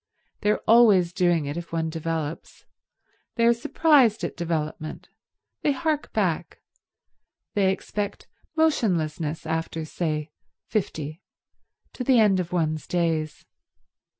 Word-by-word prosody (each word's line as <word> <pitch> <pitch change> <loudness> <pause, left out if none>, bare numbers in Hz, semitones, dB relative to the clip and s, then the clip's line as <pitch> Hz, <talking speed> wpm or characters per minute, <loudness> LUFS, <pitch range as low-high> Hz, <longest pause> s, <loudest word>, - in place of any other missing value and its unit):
They 210 - 0
are 210 - +1
always 210 -7 +6
doing 175 -4 +2
it 145 +3 -4
if 170 0 -7
one 165 -1 -1
develops. 160 -1 -4 0.7
They 230 - +2
are 235 - +6
surprised 250 - +3
at 170 - -3
development. 155 -2 -4 0.5
They 290 - +2
hark 305 +1 -1
back; - - -1 0.9
they 195 -2 +3
expect 205 +1 -4 0.3
motionlessness 165 - 0
after, 160 0 -3
say, 155 -2 -3 0.3
fifty, 160 -6 -3 0.7
to 250 - -4
the 250 -1 +4
end 205 -4 +4
of 175 -1 -3
one's 155 -3 -1
days. 165 -3 -1
175 Hz, 120 wpm, -25 LUFS, 160-220 Hz, 0.9 s, always